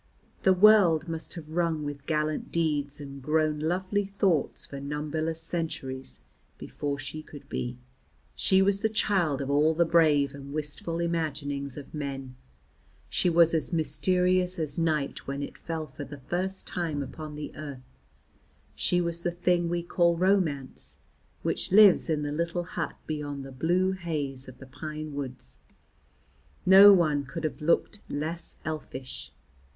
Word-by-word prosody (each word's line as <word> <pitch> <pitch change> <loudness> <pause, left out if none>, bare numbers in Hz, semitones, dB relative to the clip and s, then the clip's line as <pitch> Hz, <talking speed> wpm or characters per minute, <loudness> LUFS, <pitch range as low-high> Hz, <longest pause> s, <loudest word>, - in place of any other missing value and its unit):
The 190 - +5
world 180 -5 +6
must 165 +1 -5
have 160 -3 -8
rung 165 -2 0
with 145 -1 -6
gallant 155 -1 -1
deeds 145 -4 0
and 140 -1 -8
grown 155 +1 +1
lovely 185 +5 0
thoughts 175 -8 +1
for 140 - -8
numberless 150 +3 -3
centuries 140 -6 -4 0.3
before 145 -1 -4
she 155 +2 -6
could 145 -2 -13
be; 120 0 -3 0.6
she 190 0 +3
was 200 0 +2
the 220 - +2
child 185 -10 +1
of 135 0 -2
all 150 +3 +3
the 170 +1 +4
brave 155 -4 +4
and 140 0 -9
wistful 155 +2 -4
imaginings 145 -5 -2
of 145 - -9
men. 135 -3 -5 0.7
She 180 - +2
was 170 -1 +5
as 160 +2 +1
mysterious 180 +4 +2
as 155 -1 -3
night 155 -4 -1
when 140 +1 -3
it - - -7
fell 165 -2 -4
for 140 0 -9
the 145 +1 -9
first 180 +8 -3
time 160 -5 -2
upon 155 +1 -8
the 150 0 -7
earth. 135 -4 -9 0.8
She 180 - +1
was 170 0 -2
the 175 - 0
thing 175 0 +1
we 170 0 -1
call 170 -1 +2
romance, 175 -8 0 0.5
which - - -1
lives 200 -3 +7
in 150 -2 0
the 145 - -2
little 170 +3 -1
hut 175 - -4
beyond 145 -3 -4
the 135 - -9
blue 175 +8 +1
haze 150 -8 -4
of 130 - -11
the 130 - -11
pine 150 +3 -7
woods. 135 -3 -7 1.1
No 195 +2 +10
one 155 -7 +3
could 165 +5 -7
have 155 0 -3
looked 170 +6 +1
less 160 +4 -4
elfish. 135 -4 -6
155 Hz, 155 wpm, -28 LUFS, 145-175 Hz, 1.1 s, No